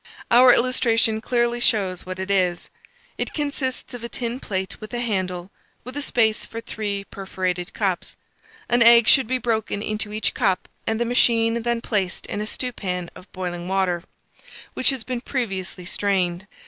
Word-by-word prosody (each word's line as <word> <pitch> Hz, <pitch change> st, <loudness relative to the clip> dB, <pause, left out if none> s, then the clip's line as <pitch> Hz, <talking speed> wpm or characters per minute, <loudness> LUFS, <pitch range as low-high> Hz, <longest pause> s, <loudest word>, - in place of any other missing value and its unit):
Our 250 Hz, +1 st, +8 dB
illustration 230 Hz, -3 st, +2 dB
clearly 240 Hz, 0 st, +1 dB
shows 195 Hz, -7 st, +1 dB
what 185 Hz, 0 st, -5 dB
it 190 Hz, +1 st, -3 dB
is: 180 Hz, -3 st, +1 dB, 0.5 s
it -, -, -3 dB
consists 280 Hz, -4 st, -3 dB
of 245 Hz, -2 st, -7 dB
a 235 Hz, -, -4 dB
tin 240 Hz, 0 st, -3 dB
plate 190 Hz, -5 st, -4 dB
with 215 Hz, +3 st, -7 dB
a -, -, -1 dB
handle, 185 Hz, -5 st, -2 dB, 0.3 s
with 255 Hz, +2 st, -8 dB
a 290 Hz, -, -2 dB
space 220 Hz, -5 st, +2 dB
for 230 Hz, -, -7 dB
three 205 Hz, -3 st, -3 dB
perforated 185 Hz, -2 st, -3 dB
cups. 195 Hz, -5 st, -1 dB, 0.5 s
An 240 Hz, 0 st, +2 dB
egg 235 Hz, 0 st, +8 dB
should 265 Hz, -5 st, +6 dB
be 255 Hz, +2 st, +1 dB
broken 220 Hz, -4 st, -1 dB
into 215 Hz, -1 st, -3 dB
each 215 Hz, +1 st, 0 dB
cup, 190 Hz, -2 st, +1 dB, 0.2 s
and 225 Hz, 0 st, 0 dB
the 235 Hz, -, +1 dB
machine 230 Hz, -1 st, +3 dB
then 235 Hz, 0 st, -1 dB
placed 195 Hz, -6 st, -1 dB
in 205 Hz, -, -4 dB
a 210 Hz, -, -3 dB
stewpan 185 Hz, -9 st, -3 dB
of 185 Hz, -, -14 dB
boiling 175 Hz, -2 st, -4 dB
water, 185 Hz, -2 st, +1 dB, 0.7 s
which -, -, +2 dB
has 265 Hz, -4 st, -2 dB
been 250 Hz, -1 st, -3 dB
previously 195 Hz, -9 st, -3 dB
strained. 190 Hz, -1 st, 0 dB
220 Hz, 170 wpm, -23 LUFS, 190-240 Hz, 0.7 s, Our